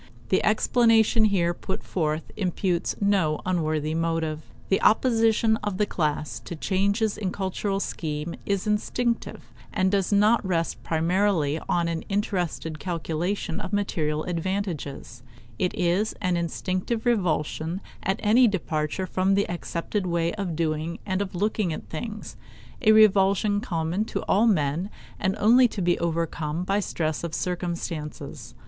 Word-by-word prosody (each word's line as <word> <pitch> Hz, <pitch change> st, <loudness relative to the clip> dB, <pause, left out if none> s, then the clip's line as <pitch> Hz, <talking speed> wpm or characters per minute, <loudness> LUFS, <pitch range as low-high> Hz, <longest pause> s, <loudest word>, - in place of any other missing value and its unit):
The -, -, +2 dB
explanation 225 Hz, -2 st, +4 dB
here 175 Hz, -5 st, +2 dB
put 190 Hz, +2 st, -5 dB
forward 155 Hz, -3 st, -1 dB
imputes 180 Hz, -1 st, -1 dB
no 190 Hz, -7 st, +2 dB
unworthy 155 Hz, -4 st, 0 dB
motive. 165 Hz, -1 st, -1 dB, 0.3 s
The 195 Hz, -, +2 dB
opposition 225 Hz, -1 st, +3 dB
of 205 Hz, -4 st, -3 dB
the 210 Hz, -, +2 dB
class 150 Hz, -5 st, -2 dB
to 170 Hz, -, -7 dB
changes 200 Hz, +6 st, 0 dB
in 205 Hz, -, -2 dB
the -, -, -8 dB
cultural 195 Hz, +1 st, -1 dB
scheme 155 Hz, -3 st, -3 dB
is 200 Hz, -2 st, -1 dB
instinctive, 230 Hz, +3 st, -1 dB, 0.2 s
and 190 Hz, -2 st, +1 dB
does 195 Hz, -1 st, +1 dB
not 210 Hz, +3 st, +4 dB
rest 170 Hz, -3 st, -1 dB
primarily 165 Hz, -2 st, +1 dB
on 170 Hz, -1 st, +2 dB
an 165 Hz, -1 st, -2 dB
interested 180 Hz, -6 st, -2 dB
calculation 170 Hz, +1 st, -2 dB
of 190 Hz, -2 st, -6 dB
material 155 Hz, -7 st, 0 dB
advantages; 170 Hz, -, -4 dB, 0.4 s
it 180 Hz, -, +1 dB
is 180 Hz, +5 st, +1 dB
an 185 Hz, -4 st, 0 dB
instinctive 185 Hz, +6 st, -2 dB
revulsion 175 Hz, -5 st, 0 dB, 0.2 s
at 190 Hz, -, -1 dB
any 235 Hz, +4 st, +6 dB
departure 165 Hz, -3 st, -1 dB
from 190 Hz, +1 st, +1 dB
the 200 Hz, -, +1 dB
accepted 175 Hz, +3 st, -3 dB
way 170 Hz, -1 st, 0 dB
of 195 Hz, -6 st, -3 dB
doing 160 Hz, +1 st, -1 dB
and 190 Hz, -1 st, -1 dB
of 190 Hz, -2 st, -4 dB
looking 205 Hz, -1 st, 0 dB
at 155 Hz, -, -6 dB
things 210 Hz, +6 st, -6 dB, 0.4 s
a 215 Hz, -, +5 dB
revulsion 205 Hz, -1 st, +5 dB
common 170 Hz, -2 st, -1 dB
to -, -, -4 dB
all 215 Hz, +4 st, +3 dB
men 165 Hz, -1 st, +1 dB, 0.3 s
and 190 Hz, 0 st, 0 dB
only 245 Hz, +4 st, +6 dB
to 220 Hz, -, -7 dB
be 175 Hz, -1 st, +2 dB
overcome 165 Hz, -1 st, -1 dB
by 195 Hz, +2 st, +1 dB
stress 160 Hz, -6 st, -2 dB
of 170 Hz, -2 st, -3 dB
circumstances. 170 Hz, -4 st, -4 dB
185 Hz, 140 wpm, -25 LUFS, 165-205 Hz, 0.4 s, any